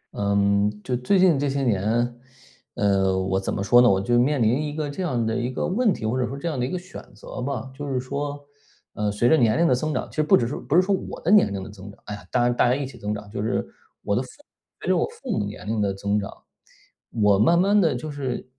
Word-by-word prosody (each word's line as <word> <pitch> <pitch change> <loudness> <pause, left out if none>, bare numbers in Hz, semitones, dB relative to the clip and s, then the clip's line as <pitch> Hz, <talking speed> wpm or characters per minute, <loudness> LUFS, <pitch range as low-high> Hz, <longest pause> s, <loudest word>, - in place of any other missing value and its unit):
嗯， 100 0 +2
就 125 - -1
最 125 +11 +1
近 180 -6 +4
这 145 0 0
些 140 0 -1
年， 120 +2 0 0.6
呃， 95 -2 +2
我 95 0 0
怎 95 - -3
么 100 - -2
说 120 +5 +6
呢， 120 - +6
我 95 - +3
就 120 +5 +2
面 135 +2 +2
临 120 +6 +2
一 150 -1 -4
个 155 -1 -2
这 145 +6 -5
样 130 -10 -1
的 110 0 -1
一 120 0 -1
个 130 - -3
问 220 +4 +2
题， 110 - -4
或 120 +4 0
者 125 - 0
说 135 - -6
这 140 - -5
样 155 -6 -2
的 - - 0
一 125 - -1
个 185 - -2
选 180 +1 -10
择 105 - -8
吧。 130 -1 -4
就 145 +2 -7
是 130 - 0
说， 140 +3 -4 0.5
呃， 105 0 -1
随 105 +4 +1
着 160 - +6
年 115 -5 +3
龄 170 - +3
的 - - +4
增 155 +5 -1
长， - - -2
其 - - -15
实 - - +3
不 155 - +5
只 120 - 0
是 130 - -4
不 150 - -2
是 180 - +6
说 200 +2 0
我 190 - -4
的 170 - 0
年 205 - +5
龄 100 -1 -4
的 - - -9
增 100 0 -11
长， - - -19
唉， 105 -3 -8
大 120 - +2
家 120 - +2
大 - - +3
家 125 - +3
一 140 0 -3
起 130 - -10
增 105 +1 -5
长。 105 0 -7
就 100 - -4
是 110 - -1 0.4
我 100 - 0
的 120 - +1
父 130 - -8
母 290 - -23 0.4
随 - - -7
着 - - +4
我 - - +2
父 455 - -8
母 - - 0
年 105 +1 -8
龄 110 0 -1
的 100 -1 +1
增 100 +2 -1
长， 100 - -5 0.8
我 105 -3 +3
慢 170 +11 +4
慢 200 +3 +3
的 165 -8 +3
就 140 +5 -5
是 130 -4 -4
125 Hz, 305 characters per minute, -24 LUFS, 105-145 Hz, 0.8 s, 说